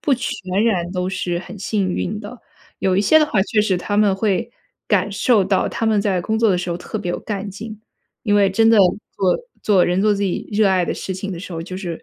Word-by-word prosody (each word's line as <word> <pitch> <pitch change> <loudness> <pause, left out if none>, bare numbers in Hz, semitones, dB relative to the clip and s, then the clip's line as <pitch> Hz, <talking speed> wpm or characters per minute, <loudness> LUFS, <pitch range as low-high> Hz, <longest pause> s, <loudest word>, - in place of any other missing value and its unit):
不 285 - +2
全 240 -1 -3 0.3
然 180 -6 0
都 180 0 -2
是 180 -2 -2
很 205 +3 -10
幸 195 -1 -1
运 210 +3 -3
的。 225 +4 -9 0.4
有 190 -1 +1
一 - - +3
些 315 +10 +5
的 305 - +3
话 210 -10 +1
确 215 +1 +1
实 200 -3 +1
他 205 +3 -3
们 210 -2 +4
会 215 +3 -1 0.4
感 205 -1 +1
受 200 0 +2
到 195 -1 +1
他 225 - -3
们 215 -2 +3
在 195 -3 0
工 220 +5 -1
作 225 -1 +3
的 185 - +2
时 175 0 -3
候 170 - -2
特 - - -6
别 175 - -3
有 - - -2
干 200 -2 -4
劲， 215 +2 -8 0.4
因 205 -3 +1
为 200 -1 +4
真 225 +4 +3
的 225 - +5
做 190 0 +1 0.2
做 195 -4 +4
人 180 +2 +1
做 210 +1 +3
自 200 - -3
己 190 -3 -2
热 205 -1 +3
爱 185 -2 +2
的 - - -2
事 190 - -5
情 195 +1 -5
的 170 - -6
时 185 - -8
候， 165 - -4
就 185 +2 -6
是 175 -4 -6
200 Hz, 275 characters per minute, -20 LUFS, 185-215 Hz, 0.4 s, 些